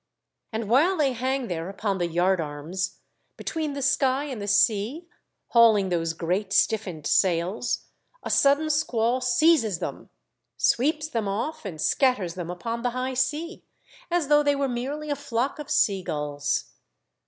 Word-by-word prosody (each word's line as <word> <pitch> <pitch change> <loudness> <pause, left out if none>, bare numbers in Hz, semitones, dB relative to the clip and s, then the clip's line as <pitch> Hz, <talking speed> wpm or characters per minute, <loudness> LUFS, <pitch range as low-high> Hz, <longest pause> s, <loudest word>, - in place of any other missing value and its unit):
And 220 -1 -3
while 310 - +3
they 280 -4 +2
hang 260 +1 -2
there 170 0 -4
upon 200 -1 -2
the 175 - 0
yard 175 +2 +1
arms, 160 +5 -4 0.4
between 310 -3 -3
the 280 -1 -4
sky 270 0 +2
and 260 -7 -5
the 205 - -5
sea, 220 - +2 0.4
hauling 220 -5 +5
those 165 -2 -1
great 185 +5 -2
stiffened 190 -9 +1
sails, 180 +7 +1 0.4
a - - -3
sudden 285 +3 +3
squall 250 -4 +1
seizes 255 - +3
them, - - -6 0.5
sweeps 300 +4 +1
them 230 -8 -2
off, 225 +8 -3
and 170 -6 -6
scatters 210 - +1
them 175 -1 -6
upon 230 +7 -4
the 245 - 0
high 260 +1 -2
sea, 295 +7 -2 0.5
as 345 -4 0
though 295 0 +5
they 290 -1 +2
were 280 0 0
merely 275 +5 -4
a - - +1
flock 250 +3 -2
of 295 - -7
sea 195 -2 +2
gulls. 145 -3 -2
230 Hz, 155 wpm, -25 LUFS, 185-280 Hz, 0.5 s, hauling